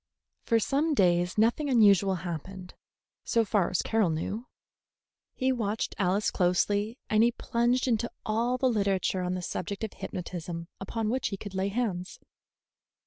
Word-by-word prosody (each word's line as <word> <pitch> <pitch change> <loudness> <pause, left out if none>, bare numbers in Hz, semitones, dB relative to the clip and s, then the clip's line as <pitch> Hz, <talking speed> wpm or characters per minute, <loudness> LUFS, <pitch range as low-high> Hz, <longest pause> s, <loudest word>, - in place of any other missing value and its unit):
For 230 -2 +2
some 295 +7 +1
days 175 -3 +2
nothing 235 +7 +2
unusual 200 -6 +5
happened, 180 +2 -6 0.5
so 230 -1 +2
far 200 -3 +1
as 180 - 0
Carroll 220 -5 +2
knew. 200 +9 -3 0.9
He 260 0 +1
watched 225 -3 -2
Alice 195 +2 +1
closely, 205 +5 +1
and 215 0 +3
he 235 +1 +5
plunged 240 +2 0
into 235 -1 +1 0.2
all 235 +4 +1
the 260 - -1
literature 200 -5 +1
on 180 0 -1
the 180 - -4
subject 200 +4 -4
of 220 - -3
hypnotism 170 -2 -6
upon 215 +3 -2
which 260 +2 0
he 195 - -4
could 200 0 -8
lay 190 +1 0
hands. 200 -4 -3
205 Hz, 150 wpm, -28 LUFS, 185-235 Hz, 0.9 s, unusual